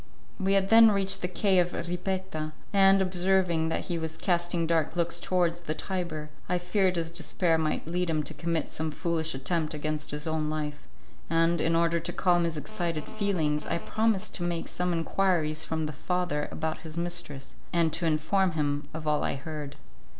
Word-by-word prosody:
We 195 0 +2
had 195 0 +2
then 225 0 +9
reached 195 -1 +1
the 180 - 0
quay 185 +1 +2
of 175 0 +1
Ripetta, 180 -3 -3 0.2
and, 195 -1 +6
observing 180 -3 +2
that - - -1
he 175 -2 -3
was 160 0 -4
casting 175 -1 0
dark 160 -1 +1
looks 170 0 +1
towards 175 -1 +1
the 155 -2 -3
Tiber, 165 -6 -4 0.2
I 180 - +2
feared 185 +1 +1
his 165 -1 -2
despair 165 0 0
might 155 -1 -1
lead 175 +2 -1
him 155 -2 +1
to 155 - -6
commit 165 +1 -1
some 160 0 -2
foolish 160 -1 -1
attempt 155 +3 -1
against 155 0 -3
his 150 0 -4
own 160 -1 0
life, 150 -1 -4 0.4
and, 165 0 +3
in 165 0 +2
order 170 0 +3
to 170 +2 -4
calm 175 -2 +3
his 165 -2 -2
excited 170 -2 -3
feelings, 175 -9 -1
I - - 0
promised 215 +2 0
to 175 - -4
make 170 -1 -2
some 180 0 -1
enquiries 165 -2 +1
from 160 0 -2
the 155 0 -3
father 175 -1 -1
about 160 0 -3
his 160 0 -8
mistress, 170 -6 -4 0.2
and 165 -2 +2
to 170 0 0
inform 165 +4 +2
him 145 -2 -1
of 160 -1 -5
all 150 -1 +2
I - - 0
heard. 145 0 -6
170 Hz, 185 wpm, -28 LUFS, 155-180 Hz, 0.4 s, then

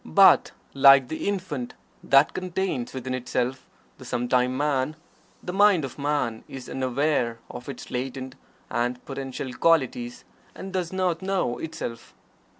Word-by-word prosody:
But 80 - +6 0.2
like 135 -2 +7
the 160 - -3
infant 170 -11 -3 0.3
that 135 +2 +5
contains 185 -8 -2
within 130 -1 -4
itself 125 +1 -2 0.3
the - - -10
sometime 125 +1 0
Man, 145 0 0 0.5
the 180 - -4
mind 195 -6 +5
of 135 - -9
Man 140 -6 -1
is 130 -2 -9
unaware 130 -2 0
of 125 +2 -8
its 140 - -8
latent 130 +1 -4 0.4
and 120 +1 -1
potential 135 -1 -5
qualities, 125 -5 +1 0.3
and 190 0 -8
does 180 -3 -2
not 185 -2 0
know 190 -10 -1
itself. 120 -7 -6
135 Hz, 135 wpm, -25 LUFS, 125-165 Hz, 0.5 s, like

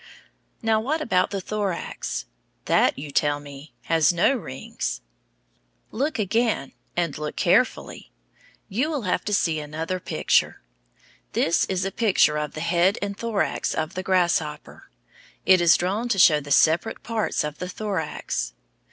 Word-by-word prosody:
Now, 220 -1 +3
what 285 +8 -1
about 200 -12 +1
the 200 - -3
thorax? 190 - -3 0.4
That, - - +3
you 145 +1 -7
tell 145 0 +1
me, 145 +1 -11
has 160 -2 +3
no 175 +10 +3
rings. 130 - -5 0.9
Look 285 +6 -1
again, 220 - 0 0.2
and 170 -5 0
look 150 0 -4
carefully. - - +1 0.6
You 255 +10 -1
will 290 -6 -2
have 185 - 0
to 210 - -2
see 160 -5 +1
another 160 +5 -4
picture. 170 - 0 0.7
This 165 - +2
is 185 -1 -2
a 195 - -2
picture 190 -9 +3
of 150 -1 -4
the 155 - -5
head 175 +4 +2
and 200 0 -3
thorax 225 -1 -1
of 160 +2 -2
the 185 - -3
grasshopper. 175 -5 -1 0.6
It 185 -2 +6
is 170 -1 +6
drawn 205 +7 -1
to 215 - +1
show 165 -5 +6
the 145 0 -10
separate 160 +9 +3
parts 225 -2 -1
of 150 0 -5
the 180 - -4
thorax. 170 - -3
180 Hz, 150 wpm, -24 LUFS, 150-210 Hz, 0.9 s, It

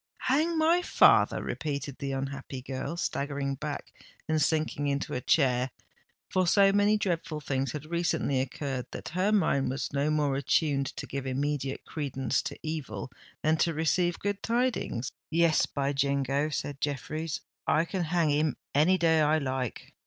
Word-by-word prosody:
"Hang 315 +6 +2
my 330 +3 +4
father!" - - +4
repeated 140 -2 -4
the 140 -1 -3
unhappy 135 -1 -5
girl, 135 +5 -4
staggering 140 -3 -2
back 145 +1 -5 0.3
and 155 -1 +1
sinking 155 -1 +1
into 140 0 -1
a 125 - -2
chair—for 130 +7 -1
so 195 +2 +5
many 205 +1 +4
dreadful 170 -6 -2
things 135 -3 -1
had 150 0 -5
recently 165 -5 0
occurred, 135 -1 -4
that 125 - -6
her 185 +7 +1
mind 140 -10 +2
was 135 +2 -3
more 145 0 +1
attuned 140 0 +1
to - - -6
give 135 -1 -5
immediate 135 0 -2
credence 135 -4 -1
to - - -6
evil 135 -9 -4 0.3
than 155 +1 +3
to 165 0 +1
receive 175 +2 +1
good 205 0 -2
tidings. 230 - -1 0.2
"Yes, 165 0 +3
by 140 0 -1
jingo!" 140 +1 +1
said 145 -2 -4
Jeffreys: 150 +2 -3 0.3
"I 160 +2 +3
can 180 0 -2
hang 165 -2 +2
him 150 -1 +1 0.2
any 160 +6 +4
day 160 -2 +3
I 155 +1 +4
like. 130 -4 -3
150 Hz, 150 wpm, -29 LUFS, 135-165 Hz, 0.3 s, so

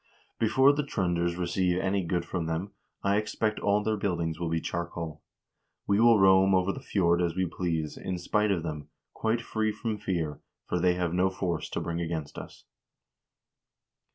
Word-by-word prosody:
Before 130 +5 +5
the 145 - 0
Tr0nders 85 -9 -1
receive 90 0 0
any 95 0 0
good 85 0 -1
from 85 -2 -3
them, 80 +5 -3 0.3
I 100 +1 +3
expect 110 0 -1
all 105 +1 +2
their 110 0 0
buildings 85 -5 -1
will 85 -1 -2
be 80 0 0
charcoal. 85 -2 -4 0.6
We 100 +1 +2
will 115 -1 +6
roam 95 0 +6
over 95 +1 +2
the - - -7
fjord 90 -9 +1
as 85 -1 0
we 95 0 +1
please, 80 -3 -2
in 95 - -4
spite 105 +4 +1
of 90 -5 0
them, 75 -3 -5 0.2
quite 115 +1 0
free 110 -1 -1
from 110 0 -4
fear, 80 -7 -2 0.3
for 90 - -1
they 90 0 +3
have 90 -2 -1
no 90 +1 +3
force 85 -4 -3
to - - -3
bring 85 0 -3
against 80 -3 -4
us." - - -12
90 Hz, 180 wpm, -28 LUFS, 85-100 Hz, 0.6 s, will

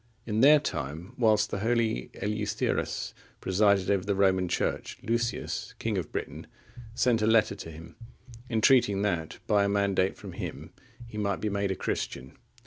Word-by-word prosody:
In 110 0 0
their 150 +3 +8
time, 85 - -5
whilst 110 -4 +3
the - - -2
holy 115 - 0
Eleutherus 105 0 -2 0.3
presided 100 0 +2
over 100 -2 +1
the 100 0 0
Roman 95 -2 +3
Church, 85 - -2
Lucius, 120 +1 -2
king 115 -2 -2
of 90 -5 -3
Britain, - - -5 0.5
sent 120 -3 +2
a 110 - +2
letter 110 -2 +4
to 80 - -8
him, 80 +1 -11 0.5
entreating 110 -3 +4
that 85 -6 -1
by 105 -2 +3
a 100 - +1
mandate 100 -2 +1
from - - -9
him - - -7 0.3
he 110 -2 -7
might 100 -2 -1
be 110 - -1
made 100 -1 -1
a 95 - -1
Christian. 65 -6 -4
100 Hz, 160 wpm, -28 LUFS, 95-110 Hz, 0.5 s, their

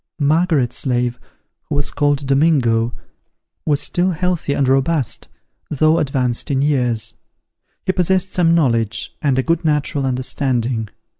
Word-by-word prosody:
Margaret's 155 -3 +1
slave, 125 -2 -1 0.5
who - - -1
was 145 0 -1
called 145 -1 0
Domingo, 135 -5 +2 0.8
was 145 -2 +2
still 180 +1 0
healthy 175 -3 -1
and 140 -2 +1
robust, 135 +1 +1 0.4
though 155 +2 +2
advanced 130 -4 -1
in 135 -1 +1
years: 125 -6 0 0.7
he - - +2
possessed 185 +1 0
some 170 -2 +3
knowledge, 115 -9 0
and 140 -3 +1
a 130 - +2
good 165 +2 0
natural 150 -3 0
understanding. 125 -3 -1
140 Hz, 130 wpm, -19 LUFS, 125-160 Hz, 0.8 s, some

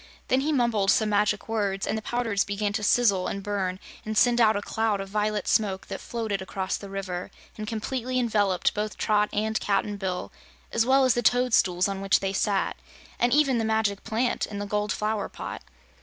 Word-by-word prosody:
Then 260 +1 +3
he 300 +3 0
mumbled 235 -8 +2
some 220 -1 +3
magic 210 0 +1
words, 200 -3 -1
and - - -1
the 220 - -3
powders 225 -3 0
began 200 0 -2
to 210 - -1
sizzle 205 -4 +3
and 200 - -4
burn 190 -2 -2 0.2
and 215 0 -3
send 240 +1 +4
out 220 -1 +5
a 205 - -1
cloud 220 -2 0
of 195 0 -6
violet 210 0 -1
smoke 195 -3 +1
that - - -5
floated 220 -4 -3
across 190 0 -3
the 200 - -8
river 185 -2 -4 0.3
and 215 0 -6
completely 250 +3 -3
enveloped 210 -6 +1
both 210 0 -3
Trot 210 -1 +2
and 215 +1 0
Cap'n 205 0 0
Bill, 185 -2 -3 0.4
as 230 +1 +1
well 265 0 +5
as 255 - +4
the 240 - 0
toadstools 220 -7 +3
on 195 -1 -4
which 195 0 +3
they 195 0 -2
sat, 195 -1 0 0.4
and 240 - +2
even 275 -4 +3
the - - 0
Magic 220 -2 0
Plant 230 +3 -1
in 205 - -7
the 205 - -3
gold 210 +1 -1
flower 215 -1 -1
pot. - - -7
210 Hz, 200 wpm, -26 LUFS, 195-225 Hz, 0.4 s, out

